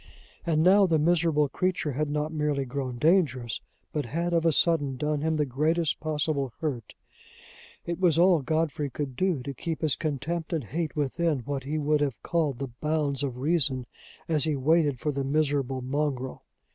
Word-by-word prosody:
And 160 -1 +3
now 195 +2 +6
the 165 -2 +3
miserable 155 -2 +3
creature 180 +1 -1
had 145 +3 -1
not 150 +1 -2
merely 150 -3 0
grown 130 -1 -4
dangerous, 140 - +2 0.3
but 150 -5 -2
had 170 +6 -1
of 170 0 +3
a - - +5
sudden 145 -4 +2
done 150 +1 -1
him 160 +1 +1
the 150 -1 +1
greatest 155 +5 0
possible 150 -4 -1
hurt! 130 -9 -4 0.9
It 170 0 -3
was 175 -4 +3
all 175 -2 +5
Godfrey 155 0 -1
could 135 0 -5
do 175 -3 0
to 140 +1 -5
keep 160 +5 -4
his 155 -4 +2
contempt 155 +2 -3
and 160 -4 -1
hate 160 +8 -3
within 150 0 0
what 135 +2 -4
he 150 +3 -2
would 150 0 +1
have 140 -6 -1
called 155 -7 0
the 135 0 -4
bounds 150 -3 0
of 130 -4 -3
reason, 135 -3 0 0.4
as 155 -2 +3
he 155 -2 +1
waited 145 0 +2
for 150 +4 -1
"the 140 -1 -2
miserable 140 -2 0
mongrel." 130 -1 -2
150 Hz, 180 wpm, -27 LUFS, 135-160 Hz, 0.9 s, now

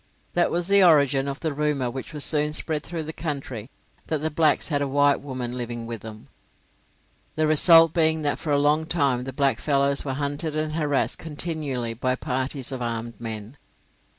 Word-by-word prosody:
That 175 - +2
was 175 0 -1
the 200 0 +6
origin 140 -5 +4
of 140 0 -5
the 160 -3 -2
rumour 140 -4 -1
which 130 +5 -7
was 150 -2 +2
soon 150 -1 +2
spread 155 -1 -1
through 165 +1 -5
the 160 +1 -7
country 135 -8 -5 0.4
that 155 - -1
the 155 +2 -3
blacks 155 +1 +1
had 145 -3 0
a 140 - 0
white 145 +1 +2
woman 130 -3 -5
living 120 -1 -5
with 115 -2 -6
them, 110 -1 -11 1.1
the 155 - +1
result 165 +1 +7
being 160 -2 +2
that 145 - -1
for 155 - -5
a 145 - +3
long 150 +2 +2
time 135 -7 0
the 135 - -5
blackfellows 140 +1 +1
were 135 - -3
hunted 145 +3 -3
and 155 0 -2
harassed 150 -3 -1
continually 145 -7 -3
by 130 +2 -1
parties 130 +1 -2
of 130 -2 -5
armed 115 0 -5
men. 110 +3 -7
145 Hz, 185 wpm, -24 LUFS, 130-155 Hz, 1.1 s, result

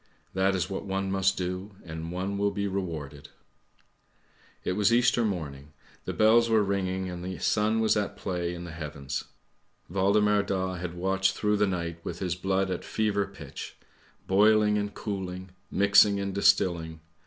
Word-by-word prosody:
That 95 +1 +2
is 90 -4 0
what 95 - -4
one 95 0 -1
must 95 0 +2
do 90 +2 -4
and 80 0 -6
one 95 +3 -3
will 100 0 +2
be 100 0 -2
rewarded! 80 -7 -5 0.4
' - - -39
" - - -37 0.3
It - - -1
was 100 +3 +2
Easter 120 0 +4
morning, 75 -8 -4 0.3
the - - -2
bells 115 +2 +5
were 110 -2 +4
ringing, 95 -1 -1
and 90 -1 -6
the 95 0 -5
sun 110 +1 +1
was 110 - +3
at 105 -1 -2
play 90 -3 -3
in 85 - -7
the 85 - -7
heavens. 70 -4 -5 0.7
Waldemar 100 +2 +3
Daa 95 -2 -2
had 90 -1 -5
watched 95 +2 +1
through 105 0 +1
the 105 0 +3
night 85 -3 -3
with 85 - -5
his 90 -2 -2
blood 95 +1 0
at 90 - -3
fever 105 -2 0
pitch; - - -9 0.5
boiling 105 +2 +4
and 105 0 -2
cooling; 95 -3 -5 0.2
mixing 100 0 +5
and 100 0 -3
distilling. 85 -5 +2
95 Hz, 170 wpm, -28 LUFS, 90-100 Hz, 0.7 s, bells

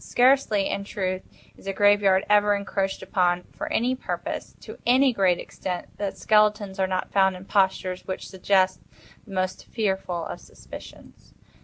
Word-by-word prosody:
Scarcely, 245 -6 +3
in 200 - -2
truth, 185 -2 -3 0.3
is - - -15
a 195 - -1
graveyard 205 -1 +4
ever 205 0 +4
encroached 195 -1 -2
upon, 180 -1 +1
for - - -5
any 245 +3 +1
purpose, - - -5
to - - -10
any 255 +2 +4
great 190 -5 +3
extent, 180 -2 -6
that 200 -1 -3
skeletons 210 -2 +2
are 190 - +2
not 185 0 -2
found 190 -1 +3
in 180 +1 -10
postures 190 -2 0
which 185 - -5
suggest 190 -1 +1 0.5
the - - -12
most 185 0 -2
fearful 190 -5 -2
of - - -6
suspicions. - - -13
195 Hz, 155 wpm, -25 LUFS, 185-205 Hz, 0.5 s, graveyard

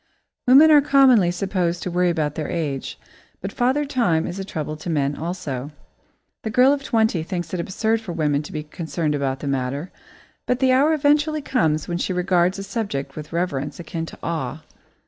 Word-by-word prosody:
Women 285 +5 +8
are 295 -1 +8
commonly 265 -9 +5
supposed 180 -1 -1
to 180 - -3
worry 180 +1 +2
about 155 -4 -1
their 155 -1 -4
age, 150 -6 -3 0.4
but 195 - -5
Father 265 +5 +1
Time 230 - +1
is 180 - -5
a - - -3
trouble 155 -5 -4
to 165 - -7
men 145 -3 0
also. 145 -5 -4 0.7
The 220 - -4
girl 250 +5 +5
of 285 - -2
twenty 220 -9 +1
thinks 175 +2 -5
it 180 - -1
absurd 220 +6 0
for 210 -6 -6
women 150 -3 0
to 150 - -10
be 155 -1 -4
concerned 155 0 -3
about 135 -2 -2
the 145 - -4
matter, 135 +4 -2 0.6
but 250 - +1
the 260 0 +3
hour 280 +5 +4
eventually 300 0 +2
comes 160 - 0
when 175 0 -2
she 185 - -1
regards 180 0 +2
the 195 - -5
subject 195 -10 -4
with 150 0 -8
reverence 155 -4 -2
akin 165 -1 -5
to - - -10
awe. 155 -2 -3
175 Hz, 190 wpm, -22 LUFS, 155-225 Hz, 0.7 s, Women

